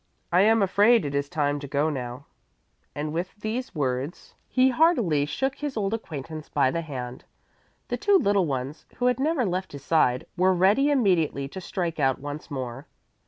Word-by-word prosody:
I 180 Hz, +2 st, +5 dB
am 220 Hz, +1 st, +4 dB
afraid 205 Hz, +3 st, +4 dB
it 140 Hz, -, -3 dB
is 140 Hz, 0 st, -1 dB
time 145 Hz, -1 st, 0 dB
to 140 Hz, -, -7 dB
go 145 Hz, +3 st, +1 dB
now" 125 Hz, 0 st, -6 dB, 0.7 s
and 150 Hz, +1 st, -3 dB
with 175 Hz, +3 st, -3 dB
these 220 Hz, +3 st, -4 dB
words 140 Hz, +3 st, -3 dB, 0.2 s
he 260 Hz, 0 st, +4 dB
heartily 235 Hz, -, +3 dB
shook 270 Hz, -, -2 dB
his 290 Hz, -4 st, -4 dB
old 200 Hz, 0 st, 0 dB
acquaintance 155 Hz, -7 st, -6 dB
by 135 Hz, -3 st, +2 dB
the 170 Hz, -, -2 dB
hand. 130 Hz, -5 st, -7 dB, 0.7 s
The -, -, -1 dB
two 405 Hz, -1 st, +4 dB
little 200 Hz, -, +2 dB
ones, 135 Hz, +2 st, -4 dB
who 245 Hz, -, -2 dB
had 250 Hz, 0 st, +2 dB
never 290 Hz, -2 st, +1 dB
left 185 Hz, -2 st, -3 dB
his 140 Hz, -1 st, -8 dB
side, 125 Hz, -6 st, +2 dB
were 185 Hz, +1 st, +3 dB
ready 205 Hz, +11 st, +4 dB
immediately 180 Hz, -, +2 dB
to 190 Hz, -, -7 dB
strike 175 Hz, -2 st, -3 dB
out 135 Hz, -1 st, +2 dB
once 145 Hz, +3 st, -7 dB
more. 130 Hz, -2 st, -5 dB
165 Hz, 180 wpm, -26 LUFS, 140-215 Hz, 0.7 s, I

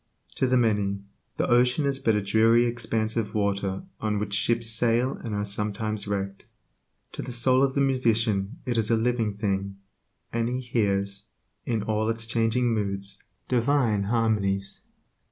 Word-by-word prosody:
To 130 Hz, -, +2 dB
the 130 Hz, 0 st, +3 dB
many, 105 Hz, -4 st, +1 dB, 0.3 s
the -, -, 0 dB
ocean 125 Hz, +4 st, +3 dB
is 135 Hz, -1 st, 0 dB
but 115 Hz, -4 st, +2 dB
a 105 Hz, -, 0 dB
dreary 115 Hz, +4 st, +4 dB
expanse 115 Hz, -2 st, -1 dB
of 110 Hz, -2 st, -2 dB
water 100 Hz, -, -1 dB, 0.2 s
on 105 Hz, -1 st, -1 dB
which 100 Hz, -1 st, -3 dB
ships 115 Hz, +3 st, +1 dB
sail 115 Hz, +3 st, +2 dB
and 110 Hz, -3 st, -3 dB
are 105 Hz, 0 st, -1 dB
sometimes 105 Hz, +1 st, -2 dB
wrecked; 100 Hz, -1 st, -4 dB, 0.6 s
to -, -, -6 dB
the -, -, -6 dB
soul 130 Hz, +2 st, +3 dB
of 135 Hz, -1 st, +1 dB
the 140 Hz, -, +2 dB
musician 115 Hz, -4 st, +1 dB
it 120 Hz, -3 st, 0 dB
is 105 Hz, -, +1 dB
a 115 Hz, -, +3 dB
living 115 Hz, -2 st, 0 dB
thing, 100 Hz, -2 st, -2 dB, 0.6 s
and 115 Hz, 0 st, 0 dB
he 125 Hz, +1 st, -2 dB
hears, 100 Hz, -5 st, -1 dB, 0.4 s
in 115 Hz, -4 st, 0 dB
all 110 Hz, +1 st, 0 dB
its 115 Hz, 0 st, 0 dB
changing 115 Hz, +1 st, +1 dB
moods, 100 Hz, -2 st, -2 dB, 0.2 s
divine 120 Hz, -5 st, +2 dB
harmonies. 100 Hz, -3 st, 0 dB
110 Hz, 160 wpm, -26 LUFS, 100-120 Hz, 0.6 s, dreary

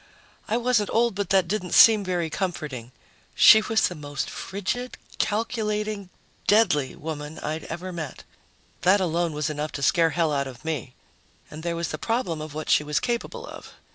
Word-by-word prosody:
I 225 Hz, -, +1 dB
wasn't 240 Hz, -4 st, +1 dB
old, 235 Hz, 0 st, +2 dB
but 200 Hz, -1 st, -3 dB
that 190 Hz, -3 st, +3 dB
didn't 185 Hz, -2 st, -2 dB
seem 225 Hz, -5 st, +8 dB
very 175 Hz, -4 st, -2 dB
comforting. 150 Hz, -, -4 dB, 0.4 s
She 220 Hz, -, +8 dB
was 220 Hz, +1 st, +2 dB
the -, -, -6 dB
most 145 Hz, -3 st, -5 dB
frigid, 205 Hz, +6 st, -4 dB, 0.2 s
calculating, 210 Hz, -2 st, -1 dB, 0.4 s
deadly 150 Hz, -, +3 dB
woman 155 Hz, 0 st, -6 dB
I'd 155 Hz, +1 st, -4 dB
ever 175 Hz, +3 st, -6 dB
met. 155 Hz, -6 st, -6 dB, 0.6 s
That 190 Hz, +3 st, +4 dB
alone 170 Hz, -2 st, 0 dB
was 150 Hz, +1 st, -2 dB
enough 150 Hz, +1 st, -4 dB
to 140 Hz, -, -4 dB
scare 165 Hz, +3 st, +4 dB
hell 160 Hz, -2 st, 0 dB
out 140 Hz, -1 st, 0 dB
of 130 Hz, +2 st, -11 dB
me. 150 Hz, -5 st, -4 dB, 0.6 s
And 155 Hz, -, -8 dB
there 170 Hz, 0 st, -2 dB
was 170 Hz, 0 st, -2 dB
the 155 Hz, -, -5 dB
problem 225 Hz, -9 st, -1 dB
of 155 Hz, -1 st, -8 dB
what 155 Hz, -, -3 dB
she -, -, +4 dB
was 150 Hz, 0 st, 0 dB
capable 245 Hz, -, -3 dB
of. -, -, -11 dB
175 Hz, 175 wpm, -25 LUFS, 155-210 Hz, 0.6 s, seem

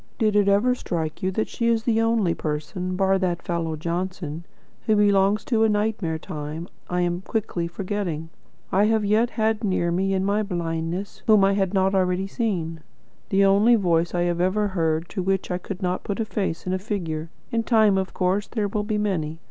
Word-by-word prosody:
Did 215 Hz, -3 st, +2 dB
it 205 Hz, -1 st, +4 dB
ever 205 Hz, +6 st, +4 dB
strike 165 Hz, -9 st, -3 dB
you 185 Hz, -, +1 dB
that 220 Hz, -, 0 dB
she 230 Hz, -, -2 dB
is 230 Hz, -1 st, +2 dB
the 225 Hz, -1 st, +2 dB
only 225 Hz, -6 st, +2 dB
person 170 Hz, +5 st, -3 dB
bar 195 Hz, 0 st, +2 dB
that 175 Hz, -2 st, -1 dB
fellow 165 Hz, -2 st, -2 dB
Johnson, 170 Hz, 0 st, -4 dB, 0.4 s
who 215 Hz, -, +4 dB
belongs 205 Hz, 0 st, +3 dB
to 225 Hz, -3 st, +2 dB
a 220 Hz, -, +4 dB
nightmare 210 Hz, -6 st, 0 dB
time 155 Hz, +2 st, -6 dB, 0.2 s
I 180 Hz, 0 st, 0 dB
am 175 Hz, 0 st, 0 dB
quickly 190 Hz, -5 st, -2 dB
forgetting 175 Hz, -3 st, -3 dB, 0.4 s
I 200 Hz, +2 st, +4 dB
have 220 Hz, -1 st, +2 dB
yet 220 Hz, +4 st, +3 dB
had 220 Hz, -2 st, 0 dB
near 185 Hz, -4 st, +1 dB
me, 195 Hz, +2 st, +1 dB
in 190 Hz, 0 st, 0 dB
my 205 Hz, +2 st, +2 dB
blindness, 175 Hz, -1 st, -3 dB
whom 215 Hz, -3 st, +6 dB
I 195 Hz, +1 st, +4 dB
had 195 Hz, -1 st, 0 dB
not 190 Hz, 0 st, +3 dB
already 185 Hz, 0 st, +1 dB
seen; 185 Hz, -7 st, -2 dB, 0.5 s
the 195 Hz, 0 st, +4 dB
only 205 Hz, +5 st, +5 dB
voice 175 Hz, -4 st, +1 dB
I 175 Hz, -, +1 dB
have 175 Hz, 0 st, 0 dB
ever 205 Hz, +3 st, +1 dB
heard 165 Hz, -3 st, 0 dB
to 195 Hz, -, -3 dB
which 190 Hz, 0 st, -1 dB
I 180 Hz, -, -1 dB
could 190 Hz, +1 st, -7 dB
not 180 Hz, 0 st, -1 dB
put 200 Hz, -, -3 dB
a 225 Hz, -, 0 dB
face 195 Hz, -6 st, -3 dB
and 185 Hz, 0 st, -1 dB
figure? 165 Hz, -6 st, -3 dB, 0.2 s
In 230 Hz, -, +1 dB
time, 220 Hz, -3 st, +4 dB
of 190 Hz, -, -3 dB
course, 190 Hz, +2 st, 0 dB
there 215 Hz, -3 st, -1 dB
will 210 Hz, +1 st, -1 dB
be 210 Hz, 0 st, -1 dB
many. 170 Hz, -7 st, -1 dB
190 Hz, 200 wpm, -24 LUFS, 175-210 Hz, 0.5 s, whom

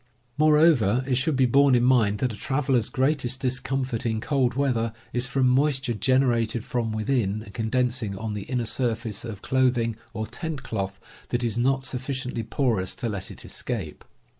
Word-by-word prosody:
Moreover, 150 Hz, -, +4 dB
it 135 Hz, -, +1 dB
should 155 Hz, +2 st, 0 dB
be 130 Hz, 0 st, +4 dB
borne 135 Hz, +2 st, +5 dB
in 120 Hz, -, +3 dB
mind 115 Hz, -5 st, +3 dB
that 125 Hz, +2 st, -1 dB
a -, -, -7 dB
traveler's 130 Hz, -1 st, 0 dB
greatest 130 Hz, -2 st, 0 dB
discomfort 130 Hz, -1 st, -2 dB
in 110 Hz, -3 st, 0 dB
cold 125 Hz, 0 st, 0 dB
weather 120 Hz, -5 st, 0 dB, 0.2 s
is 125 Hz, 0 st, +1 dB
from 130 Hz, 0 st, +2 dB
moisture 135 Hz, -1 st, +2 dB
generated 120 Hz, -2 st, +1 dB
from 115 Hz, -3 st, -1 dB
within 110 Hz, -2 st, 0 dB
and 100 Hz, -, -13 dB
condensing 120 Hz, -2 st, -1 dB
on 110 Hz, +1 st, -4 dB
the 105 Hz, -2 st, -5 dB
inner 125 Hz, -1 st, -1 dB
surface 115 Hz, -3 st, -2 dB
of 110 Hz, -5 st, -7 dB
clothing 125 Hz, -3 st, +1 dB, 0.2 s
or 110 Hz, -1 st, -4 dB
tent 160 Hz, +1 st, -5 dB
cloth 95 Hz, -5 st, -4 dB, 0.3 s
that 120 Hz, 0 st, 0 dB
is 115 Hz, -3 st, 0 dB
not 135 Hz, +3 st, +1 dB
sufficiently 130 Hz, -2 st, -3 dB
porous 110 Hz, -5 st, 0 dB
to 120 Hz, -, -3 dB
let 100 Hz, -4 st, -4 dB
it -, -, -11 dB
escape. 100 Hz, -12 st, -5 dB
125 Hz, 170 wpm, -25 LUFS, 110-135 Hz, 0.3 s, borne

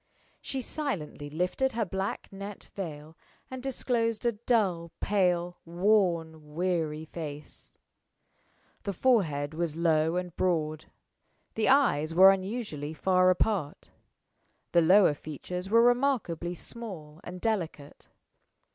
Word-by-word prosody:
She 270 Hz, -, -3 dB
silently 205 Hz, -, -4 dB
lifted 180 Hz, -, 0 dB
her 225 Hz, -1 st, 0 dB
black 190 Hz, +2 st, -3 dB
net 200 Hz, +1 st, -8 dB
veil 155 Hz, -4 st, -7 dB, 0.4 s
and 260 Hz, -1 st, -6 dB
disclosed 235 Hz, -4 st, -1 dB
a 235 Hz, -, +4 dB
dull, 205 Hz, -7 st, 0 dB
pale, 180 Hz, -3 st, +1 dB
worn, 170 Hz, -4 st, 0 dB
weary 165 Hz, -3 st, -1 dB
face. 150 Hz, -2 st, -8 dB, 1.0 s
The 200 Hz, -, -3 dB
forehead 165 Hz, -, +1 dB
was 165 Hz, -1 st, -2 dB
low 160 Hz, -1 st, +2 dB
and 180 Hz, -1 st, -3 dB
broad; 155 Hz, -4 st, 0 dB, 0.7 s
the 220 Hz, -, +1 dB
eyes 165 Hz, -, +3 dB
were 190 Hz, +2 st, +9 dB
unusually 190 Hz, -7 st, -3 dB
far 185 Hz, +4 st, +3 dB
apart; 185 Hz, -5 st, 0 dB, 0.8 s
the 170 Hz, -, +5 dB
lower 180 Hz, 0 st, +6 dB
features 180 Hz, +5 st, -6 dB
were 230 Hz, +2 st, +5 dB
remarkably 240 Hz, -, +1 dB
small 175 Hz, -8 st, -7 dB
and 180 Hz, +1 st, -8 dB
delicate. 175 Hz, -9 st, -3 dB
180 Hz, 110 wpm, -29 LUFS, 160-215 Hz, 1.0 s, were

